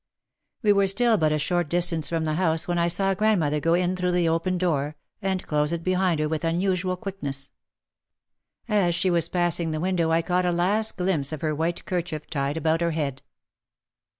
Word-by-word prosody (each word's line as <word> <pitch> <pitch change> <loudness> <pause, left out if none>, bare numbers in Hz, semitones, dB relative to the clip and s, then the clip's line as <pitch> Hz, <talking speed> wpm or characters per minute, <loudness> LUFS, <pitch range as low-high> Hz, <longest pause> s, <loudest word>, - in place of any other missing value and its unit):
We 205 -1 +5
were 200 -1 +3
still 230 +4 +3
but 155 -1 +2
a 155 - +1
short 175 +2 -1
distance 170 -3 +1
from 165 -1 -1
the 155 - -1
house 160 -1 0
when 175 -1 0
I 170 - +2
saw 195 +3 +2
grandmother 185 -8 +1
go 165 +3 +2
in 180 +1 0
through 180 -1 -1
the 175 -1 +2
open 165 +3 0
door, 155 -5 -1 0.3
and 190 -2 -2
close 150 0 0
it 170 -1 -3
behind 185 -2 +1
her 155 - +1
with 160 +1 -3
unusual 185 +2 0
quickness. 145 -9 -4 1.2
As 200 -6 +2
she 180 +2 +1
was 170 -1 +1
passing 175 -2 +2
the 155 0 -2
window 175 -1 0
I 165 +1 +2
caught 180 +1 +1
a - - +2
last 200 +6 0
glimpse 180 -6 0
of 155 - -5
her 155 -1 0
white 165 +3 -2
kerchief 165 -4 -3
tied 140 0 -1
about 160 +1 +1
her 170 - +2
head. 145 -4 -3
170 Hz, 200 wpm, -25 LUFS, 155-185 Hz, 1.2 s, We